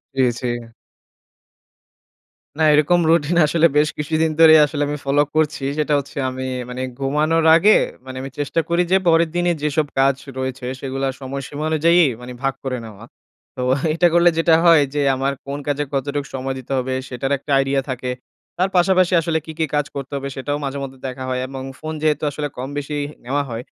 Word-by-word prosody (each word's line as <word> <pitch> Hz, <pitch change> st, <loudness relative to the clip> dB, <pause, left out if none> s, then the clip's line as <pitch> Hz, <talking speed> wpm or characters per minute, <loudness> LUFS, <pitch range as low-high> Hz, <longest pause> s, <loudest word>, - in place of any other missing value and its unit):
জ্বি, 135 Hz, -, +2 dB, 0.2 s
জ্বি। 125 Hz, -, -2 dB, 2.1 s
না -, -, -2 dB
এইরকম 155 Hz, +4 st, +4 dB
রুটিন 165 Hz, +1 st, +2 dB
আসলে 165 Hz, +2 st, +3 dB
বেশ 150 Hz, +1 st, +4 dB
কিছুদিন 155 Hz, +1 st, 0 dB
ধরেই 160 Hz, -1 st, +8 dB
আসলে 145 Hz, 0 st, -2 dB
আমি 150 Hz, 0 st, -3 dB
ফলো 140 Hz, +1 st, +3 dB
করছি। 155 Hz, -2 st, 0 dB
সেটা 150 Hz, -1 st, 0 dB
হচ্ছে 140 Hz, -, -10 dB
আমি 130 Hz, 0 st, -5 dB, 0.2 s
মানে 125 Hz, +1 st, -5 dB, 0.2 s
ঘুমানোর 155 Hz, +4 st, +1 dB
আগে 205 Hz, +6 st, +5 dB, 0.3 s
মানে 130 Hz, 0 st, -8 dB
আমি 135 Hz, 0 st, -7 dB
চেষ্টা 145 Hz, +3 st, -1 dB
করি 170 Hz, +1 st, +2 dB
যে 190 Hz, -, +6 dB
পরের 165 Hz, 0 st, +4 dB
দিনেই, 175 Hz, -1 st, +1 dB
যেসব 150 Hz, 0 st, 0 dB
কাজ 135 Hz, 0 st, +4 dB, 0.2 s
রয়েছে 130 Hz, -1 st, -4 dB
সেগুলা 135 Hz, 0 st, -3 dB
সময়সীমা 140 Hz, +2 st, -6 dB
অনুযায়ী 170 Hz, +3 st, +4 dB, 0.2 s
মানে 125 Hz, 0 st, -8 dB
ভাগ 135 Hz, -, +1 dB
করে 130 Hz, -2 st, -2 dB
নেওয়া। 110 Hz, 0 st, -12 dB, 0.5 s
তো 125 Hz, -, -5 dB, 0.3 s
এটা 175 Hz, +1 st, +4 dB
করলে 175 Hz, 0 st, +5 dB
যেটা 165 Hz, -1 st, +4 dB
হয় 165 Hz, -3 st, +7 dB
যে 145 Hz, -, 0 dB
আমার 135 Hz, +1 st, -1 dB
কোন 140 Hz, +1 st, -5 dB
কাজে 145 Hz, 0 st, 0 dB
কতটুক 140 Hz, +1 st, -2 dB
সময় 135 Hz, 0 st, -3 dB
দিতে 130 Hz, -, -11 dB
হবে, 130 Hz, 0 st, -2 dB
সেটার 135 Hz, +2 st, -4 dB
একটা 145 Hz, -, -8 dB
আইডিয়া 135 Hz, 0 st, +1 dB
থাকে। 125 Hz, 0 st, -3 dB, 0.5 s
তার 185 Hz, +2 st, +1 dB
পাশাপাশি 185 Hz, 0 st, +3 dB
আসলে 160 Hz, 0 st, 0 dB
কী, 160 Hz, -, -7 dB
কী 160 Hz, -, +2 dB
কাজ 145 Hz, -1 st, +1 dB
করতে 135 Hz, 0 st, -6 dB
হবে, 140 Hz, 0 st, -4 dB
সেটাও 145 Hz, +2 st, -2 dB
মাঝেমধ্যে 135 Hz, -1 st, -5 dB
দেখা 130 Hz, 0 st, -6 dB
হয় 130 Hz, 0 st, -1 dB
এবং 135 Hz, 0 st, -7 dB, 0.2 s
ফোন 155 Hz, 0 st, -5 dB
যেহেতু 155 Hz, -1 st, +1 dB
আসলে 145 Hz, +1 st, -3 dB
কম 130 Hz, +2 st, -5 dB
বেশি 145 Hz, +1 st, -3 dB, 0.3 s
নেওয়া 140 Hz, +3 st, 0 dB
হয়, 115 Hz, +1 st, -5 dB
145 Hz, 185 wpm, -20 LUFS, 135-160 Hz, 2.1 s, ধরেই